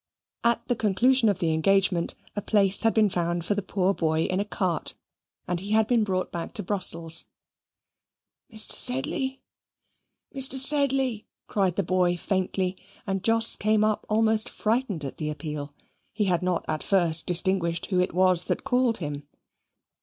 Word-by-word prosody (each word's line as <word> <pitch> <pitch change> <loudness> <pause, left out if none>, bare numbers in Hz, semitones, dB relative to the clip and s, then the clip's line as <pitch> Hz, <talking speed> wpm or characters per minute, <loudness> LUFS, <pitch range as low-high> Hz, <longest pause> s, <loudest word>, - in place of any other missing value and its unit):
At 235 0 0
the 245 - 0
conclusion 230 +3 +2
of 200 - 0
the 165 -2 -1
engagement, 180 +1 +1 0.2
a 205 - -3
place 200 -2 +2
had 225 - +3
been 220 -1 +4
found 175 -2 -2
for 205 - 0
the 205 - -3
poor 190 0 -1
boy 160 -3 -1
in 185 +2 -2
a 205 - -1
cart, 185 -4 -1 0.5
and 175 -1 -2
he 200 +3 -4
had 220 0 +3
been 230 0 +1
brought 185 -3 -3
back 170 -1 -6
to - - +2
Brussels. 170 -4 +2 1.3
"Mr. 220 -1 +1
Sedley, 265 - +1 0.9
Mr. 270 -1 +1
Sedley!" 270 -4 +1 0.2
cried 190 -4 -1
the 200 - 0
boy, 180 0 0
faintly, 185 0 -2 0.3
and 195 -1 -3
Jos 225 0 +4
came 215 0 +1
up 215 -1 -1
almost 220 0 +2
frightened 215 - -2
at 135 - -7
the 155 -1 -3
appeal. 150 -1 -6 0.4
He 210 - -2
had 180 -2 0
not 180 -1 -2
at 155 -1 -3
first 170 -5 +3
distinguished 175 -1 +1
who 185 - +1
it 180 - 0
was 185 0 +2
that - - -3
called 250 -2 +1
him. 145 -5 -6
195 Hz, 165 wpm, -25 LUFS, 175-220 Hz, 1.3 s, been